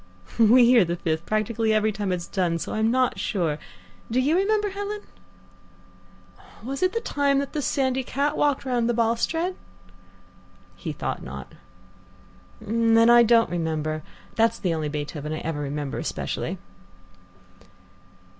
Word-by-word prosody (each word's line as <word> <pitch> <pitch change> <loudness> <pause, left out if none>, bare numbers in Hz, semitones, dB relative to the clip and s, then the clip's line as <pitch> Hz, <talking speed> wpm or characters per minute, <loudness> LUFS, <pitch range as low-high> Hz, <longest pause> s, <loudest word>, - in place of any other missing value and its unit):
"We 235 +2 +7
hear 240 -3 +6
the 170 0 -2
Fifth 165 -1 -3
practically 220 +1 0
every 215 0 +2
time 205 -2 -3
it's 175 -1 -2
done, 175 -3 -1
so - - -5
I'm 220 +1 +1
not 255 +1 +1
sure 165 -8 -1 0.5
do 240 +3 +1
you 285 +5 +2
remember, 415 +2 +1
Helen?" 405 +1 -4 1.6
"Was 270 +3 -5
it 370 +1 +2
the 460 - -1
time 285 -9 +1
the 280 +2 -2
sandy 265 -1 0
cat 285 +4 -1
walked 290 -3 +1
round 240 -2 0
the 240 - +1
balustrade?" 240 +10 0 1.2
He - - -5
thought - - -4
not. - - -9 1.1
"Then 230 +1 +3
I 240 0 +8
don't 230 -4 +4
remember. 155 -2 -2 0.3
That's 230 0 +2
the 180 -4 -1
only 155 -2 -2
Beethoven 150 0 -4
I - - -3
ever 160 -2 -3
remember 145 -1 -3
specially." - - -3
230 Hz, 140 wpm, -25 LUFS, 170-270 Hz, 1.6 s, I